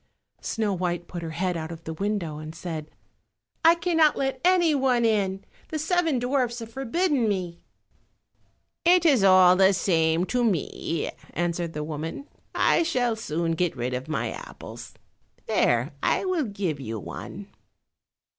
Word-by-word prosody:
Snow 215 Hz, -3 st, -1 dB
white 175 Hz, -1 st, -2 dB
put 175 Hz, -, -6 dB
her 165 Hz, -, -5 dB
head 180 Hz, +3 st, -1 dB
out 160 Hz, 0 st, -4 dB
of 165 Hz, 0 st, -9 dB
the 160 Hz, -, -5 dB
window 185 Hz, -5 st, -2 dB
and 155 Hz, +1 st, -8 dB
said, 160 Hz, -3 st, -6 dB, 0.7 s
"I 330 Hz, +1 st, +7 dB
cannot 330 Hz, -3 st, +3 dB
let 270 Hz, -1 st, -2 dB
any 355 Hz, -3 st, +4 dB
one 260 Hz, -4 st, +2 dB
in; 195 Hz, -3 st, 0 dB, 0.2 s
the 315 Hz, -, -4 dB
seven 325 Hz, -2 st, +1 dB
dwarfs 245 Hz, -1 st, 0 dB
have 230 Hz, -1 st, -8 dB
forbidden 270 Hz, -1 st, +1 dB
me." 180 Hz, -4 st, -3 dB, 1.2 s
"It 350 Hz, 0 st, +5 dB
is 270 Hz, -10 st, +5 dB
all 185 Hz, -1 st, +7 dB
the 190 Hz, +1 st, +5 dB
same 165 Hz, -2 st, +2 dB
to 245 Hz, +4 st, 0 dB
me," 170 Hz, -5 st, -1 dB, 0.2 s
answered 170 Hz, -1 st, -1 dB
the 150 Hz, -, -3 dB
woman, 160 Hz, -, -5 dB, 0.3 s
"I -, -, +3 dB
shall 250 Hz, -9 st, +1 dB
soon 165 Hz, -6 st, -2 dB
get 165 Hz, -3 st, -1 dB
rid 125 Hz, +1 st, -2 dB
of 125 Hz, +2 st, -4 dB
my 155 Hz, -, -2 dB
apples. -, -, -10 dB, 0.5 s
There, -, -, +2 dB
I -, -, +1 dB
will 365 Hz, -6 st, 0 dB
give 195 Hz, -, -3 dB
you 115 Hz, -4 st, -5 dB
one." -, -, -8 dB
195 Hz, 155 wpm, -26 LUFS, 165-270 Hz, 1.2 s, I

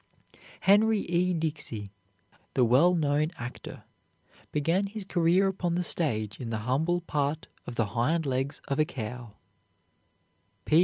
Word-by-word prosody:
Henry 210 Hz, +2 st, +5 dB
E. 175 Hz, +1 st, +1 dB
Dixey, 150 Hz, -, -3 dB, 0.6 s
the 125 Hz, -, +4 dB
well 145 Hz, +10 st, +5 dB
known 150 Hz, -1 st, +1 dB
actor, 120 Hz, +2 st, -8 dB, 0.7 s
began 165 Hz, +7 st, +1 dB
his 205 Hz, 0 st, -6 dB
career 180 Hz, +1 st, +3 dB
upon 180 Hz, -3 st, -1 dB
the 180 Hz, -, 0 dB
stage 110 Hz, -, -1 dB
in 120 Hz, -, -5 dB
the 110 Hz, -, -1 dB
humble 160 Hz, +8 st, +1 dB
part 150 Hz, -2 st, -2 dB, 0.2 s
of 120 Hz, -, -6 dB
the 115 Hz, -, +2 dB
hind 155 Hz, +8 st, +1 dB
legs 135 Hz, +1 st, -2 dB
of 140 Hz, +1 st, -1 dB
a 155 Hz, -, +5 dB
cow. 120 Hz, -6 st, -7 dB
155 Hz, 135 wpm, -28 LUFS, 125-175 Hz, 0.7 s, Henry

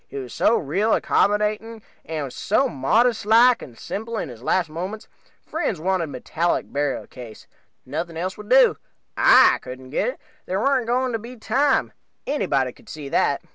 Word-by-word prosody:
He 140 Hz, -, -8 dB
was 130 Hz, -3 st, -6 dB
so 235 Hz, -, +3 dB
real 190 Hz, +9 st, +1 dB
accommodating, 210 Hz, +2 st, 0 dB, 0.2 s
and 150 Hz, -5 st, -5 dB
so 265 Hz, +7 st, +1 dB
modest 225 Hz, -, +1 dB
like 230 Hz, +3 st, +5 dB
and 120 Hz, -4 st, -11 dB
simple 225 Hz, +3 st, -5 dB
in 170 Hz, -, -3 dB
his 120 Hz, -2 st, -11 dB
last 180 Hz, +7 st, +1 dB
moments. 185 Hz, +8 st, -6 dB, 0.4 s
Friends 185 Hz, -, -2 dB
wanted 180 Hz, 0 st, 0 dB
metallic 160 Hz, +5 st, -2 dB
burial 145 Hz, -1 st, -1 dB
case 120 Hz, -4 st, -12 dB, 0.4 s
nothing 160 Hz, +5 st, -4 dB
else 185 Hz, +3 st, -3 dB
would 210 Hz, 0 st, -11 dB
do. 260 Hz, +1 st, +5 dB, 0.4 s
I -, -, +6 dB
couldn't 130 Hz, 0 st, -10 dB
get -, -, 0 dB
it. -, -, -4 dB, 0.3 s
There 190 Hz, +1 st, -1 dB
warn't 260 Hz, -1 st, +1 dB
going 250 Hz, +1 st, +1 dB
to 225 Hz, -, -2 dB
be 235 Hz, +3 st, -10 dB
time 260 Hz, +5 st, +1 dB, 0.3 s
anybody 135 Hz, -, 0 dB
could -, -, -19 dB
see 150 Hz, -3 st, -7 dB
that. -, -, +1 dB
190 Hz, 170 wpm, -23 LUFS, 145-230 Hz, 0.4 s, I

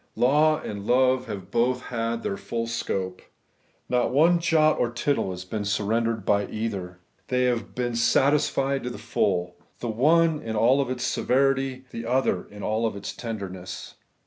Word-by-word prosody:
Law 150 Hz, +4 st, +4 dB
and 100 Hz, 0 st, -6 dB
love 130 Hz, +1 st, +3 dB
have 100 Hz, -2 st, -7 dB
both 125 Hz, +2 st, +1 dB
had 115 Hz, 0 st, -2 dB
their 100 Hz, -, -1 dB
full 115 Hz, +3 st, -3 dB
scope. 95 Hz, -5 st, -3 dB, 0.7 s
Not 125 Hz, -1 st, +1 dB
one 165 Hz, +6 st, +4 dB
jot 155 Hz, -2 st, +3 dB
or 120 Hz, -, +2 dB
tittle 130 Hz, -2 st, 0 dB
has 90 Hz, 0 st, -6 dB
been 105 Hz, +2 st, -3 dB
surrendered 110 Hz, +2 st, 0 dB
by 100 Hz, -1 st, +2 dB
either. 100 Hz, -5 st, -4 dB, 0.3 s
They 125 Hz, 0 st, +1 dB
have 120 Hz, -2 st, -1 dB
been 120 Hz, -1 st, -1 dB
satisfied 135 Hz, +2 st, +2 dB
to 125 Hz, -, -3 dB
the 120 Hz, -, -7 dB
full; 90 Hz, -4 st, -1 dB, 0.2 s
the 120 Hz, -, -4 dB
one 155 Hz, +7 st, +3 dB
in 110 Hz, -1 st, -4 dB
all 125 Hz, +5 st, +3 dB
its 130 Hz, -1 st, -3 dB
severity, 135 Hz, 0 st, +1 dB
the 115 Hz, 0 st, -6 dB
other 125 Hz, -7 st, +1 dB
in 105 Hz, 0 st, -10 dB
all 110 Hz, +2 st, 0 dB
its 100 Hz, -, -6 dB
tenderness. 95 Hz, -5 st, -6 dB
115 Hz, 160 wpm, -25 LUFS, 105-130 Hz, 0.7 s, Law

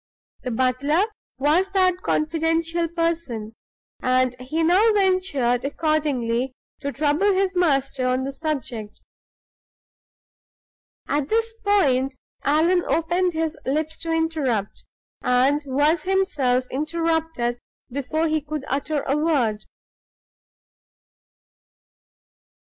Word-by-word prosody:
The -, -, -4 dB
butler 260 Hz, -, +1 dB, 0.3 s
was 310 Hz, +8 st, +2 dB
that 370 Hz, -2 st, +3 dB
confidential 330 Hz, +1 st, 0 dB
person; 325 Hz, -10 st, -2 dB, 0.5 s
and 255 Hz, 0 st, +2 dB
he 310 Hz, +6 st, -1 dB
now 380 Hz, +7 st, +5 dB
ventured 370 Hz, -12 st, +1 dB
accordingly 270 Hz, -5 st, 0 dB, 0.2 s
to 280 Hz, -, -3 dB
trouble 305 Hz, +8 st, +2 dB
his 385 Hz, 0 st, +1 dB
master 275 Hz, -7 st, +1 dB
on 255 Hz, +1 st, +1 dB
the 270 Hz, -, -3 dB
subject. 265 Hz, -8 st, -4 dB, 2.1 s
At 290 Hz, 0 st, -1 dB
this 455 Hz, 0 st, +1 dB
point 275 Hz, -11 st, +2 dB, 0.3 s
Allan 335 Hz, +5 st, +3 dB
opened 345 Hz, +2 st, +1 dB
his 320 Hz, 0 st, -1 dB
lips 310 Hz, +4 st, -2 dB
to 330 Hz, -, -3 dB
interrupt, 305 Hz, -11 st, -1 dB, 0.3 s
and 260 Hz, +4 st, +3 dB
was 295 Hz, +5 st, +2 dB
himself 300 Hz, -10 st, +1 dB
interrupted 320 Hz, -4 st, -1 dB, 0.3 s
before 310 Hz, +5 st, -1 dB
he 310 Hz, 0 st, 0 dB
could 300 Hz, -1 st, -5 dB
utter 285 Hz, +2 st, -1 dB
a 275 Hz, -, 0 dB
word. 275 Hz, -9 st, +1 dB
305 Hz, 100 wpm, -23 LUFS, 260-335 Hz, 2.1 s, now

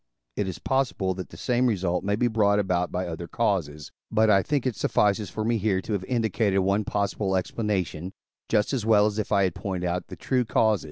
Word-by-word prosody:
It 100 Hz, -, -1 dB
is 95 Hz, -, -4 dB
possible 125 Hz, -8 st, 0 dB
that 95 Hz, -1 st, -7 dB
the -, -, -12 dB
same 125 Hz, 0 st, +1 dB
result 90 Hz, -6 st, 0 dB
may 100 Hz, +1 st, +1 dB
be 120 Hz, +3 st, +1 dB
brought 105 Hz, -3 st, +2 dB
about 90 Hz, -3 st, 0 dB
by 90 Hz, +1 st, -2 dB
other 85 Hz, 0 st, -6 dB
causes; 85 Hz, -9 st, -1 dB, 0.2 s
but 110 Hz, 0 st, +3 dB
I 95 Hz, -1 st, +5 dB
think 140 Hz, +4 st, -1 dB
it 125 Hz, -4 st, 0 dB
suffices 105 Hz, -1 st, +1 dB
for 110 Hz, -, -4 dB
me 115 Hz, 0 st, +1 dB
here 100 Hz, -2 st, +1 dB
to 110 Hz, -, -4 dB
have 100 Hz, -3 st, -1 dB
indicated 110 Hz, -4 st, 0 dB
one 100 Hz, +3 st, +1 dB
possible 100 Hz, -1 st, -1 dB
explanation, 95 Hz, -3 st, -2 dB, 0.4 s
just 105 Hz, +4 st, +1 dB
as 125 Hz, -5 st, -1 dB
well 105 Hz, -2 st, +5 dB
as 105 Hz, 0 st, -1 dB
if 105 Hz, -, -3 dB
I 100 Hz, -2 st, +4 dB
had 90 Hz, -3 st, +1 dB
pointed 90 Hz, -2 st, -3 dB
out 90 Hz, +1 st, -2 dB
the -, -, -8 dB
true 130 Hz, -2 st, 0 dB
cause. 110 Hz, -2 st, +2 dB
100 Hz, 220 wpm, -26 LUFS, 95-110 Hz, 0.4 s, I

